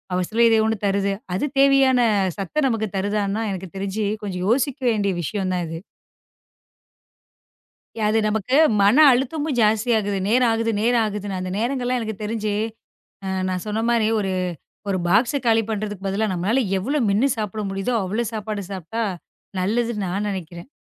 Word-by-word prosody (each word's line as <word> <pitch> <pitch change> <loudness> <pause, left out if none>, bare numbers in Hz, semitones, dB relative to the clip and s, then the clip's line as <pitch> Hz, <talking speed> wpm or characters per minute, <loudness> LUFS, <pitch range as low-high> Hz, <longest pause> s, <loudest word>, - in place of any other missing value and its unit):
அவசரம் 215 +6 +2
ஏதோ 225 -1 +4
ஒண்ணு 220 0 0
தருது. 200 0 +1 0.2
அது 240 - 0
தேவையான 275 -2 +5 0.4
சத்த 235 - -1
நமக்குத் 220 -4 -2
தருதானா 205 +2 -1
எனக்குத் 190 -1 -7
தெரிஞ்சு 200 +2 -2 0.2
கொஞ்சம் 180 -3 -4
யோசிக்க 265 +2 +1
வேண்டிய 200 -3 0
விஷயம் 190 +3 -2
தான் 180 -1 -1
இது. 165 0 -6 2.3
அது 220 +1 +2
நமக்கு 220 +5 0 0.3
மன 205 +5 +5 0.2
அழுத்தமும் 275 +2 -1
ஜாஸ்தியா 220 +2 +3
இருக்கு. 200 -1 -2
நேரம் 245 0 +4
ஆகுது, 230 0 0
நேரம் 235 +1 +3
ஆகுதுன்னு 205 -2 -3
அந்த 185 0 -4
நேரங்கள்லாம் 250 +1 0
எனக்குத் 220 -2 -5
தெரிஞ்சு, 215 -1 -2 0.7
அ - - -3 0.2
நான் 185 -1 -3
சொன்ன 215 +1 -1
மாதிரி 230 -2 +2
ஒரு 195 -2 -1 0.6
ஒரு 185 - 0
பாக்ஸ் 230 +9 +3
காலி 225 -1 +4
பண்ணுறதுக்குப் 205 -2 -4
பதிலா, 205 +3 0
நம்மளால 195 +9 +1 0.2
எவ்வளோ 275 +10 -1
மென்னு 215 +8 +3
சாப்பிட 215 0 -3
முடியுதோ 195 +5 -2
அவ்வளோ 215 +6 -1
சாப்பாடு 210 -1 -4
சாப்பிட்டா 190 +5 -5 0.6
நல்லதுன்னு 220 +1 0
நான் 200 +3 -2
நினைக்கிறேன். 175 +2 -7
215 Hz, 150 wpm, -22 LUFS, 195-235 Hz, 2.3 s, தேவையான